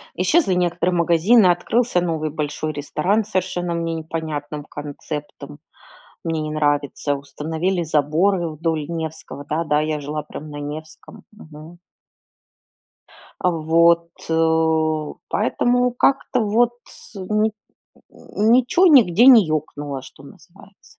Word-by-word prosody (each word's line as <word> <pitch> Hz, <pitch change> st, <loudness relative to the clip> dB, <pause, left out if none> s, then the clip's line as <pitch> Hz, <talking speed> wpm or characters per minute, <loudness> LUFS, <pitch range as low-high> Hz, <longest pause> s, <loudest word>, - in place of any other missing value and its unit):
Исчезли 190 Hz, -, +2 dB
некоторые 175 Hz, 0 st, 0 dB
магазины, 175 Hz, +6 st, +4 dB
открылся 180 Hz, +3 st, +1 dB
новый 160 Hz, -3 st, -2 dB
большой 150 Hz, +1 st, -3 dB
ресторан 155 Hz, +8 st, -1 dB
с 215 Hz, -, -15 dB
совершенно 175 Hz, -1 st, -2 dB
мне 165 Hz, 0 st, -2 dB
непонятным 155 Hz, -2 st, -5 dB
концептом, 150 Hz, 0 st, -8 dB, 0.7 s
мне 165 Hz, -2 st, -2 dB
не 155 Hz, -, -4 dB
нравится. 145 Hz, -1 st, 0 dB
Установили 160 Hz, +6 st, -3 dB
заборы 165 Hz, +4 st, +1 dB
вдоль 155 Hz, -1 st, -3 dB
Невского 160 Hz, -3 st, -6 dB
Да-да, 155 Hz, -1 st, 0 dB
я 155 Hz, 0 st, -2 dB
жила 150 Hz, +1 st, -4 dB
прям 150 Hz, +1 st, -10 dB
на 145 Hz, -, -8 dB
Невском, 155 Hz, +2 st, -9 dB
мгм. 160 Hz, -4 st, -13 dB, 1.6 s
А 180 Hz, -, +2 dB
вот, 170 Hz, +1 st, +3 dB, 1.2 s
поэтому 245 Hz, +3 st, +1 dB
как-то 255 Hz, 0 st, +1 dB
вот 225 Hz, +3 st, +2 dB
тс -, -, -14 dB
ни 215 Hz, +3 st, 0 dB, 0.8 s
ничё 250 Hz, -, +3 dB
нигде 245 Hz, -, +6 dB
не 240 Hz, -6 st, +8 dB
екнуло, 145 Hz, -3 st, -4 dB
что 135 Hz, +1 st, -15 dB
называется. 195 Hz, +7 st, -18 dB
165 Hz, 110 wpm, -21 LUFS, 150-190 Hz, 1.6 s, не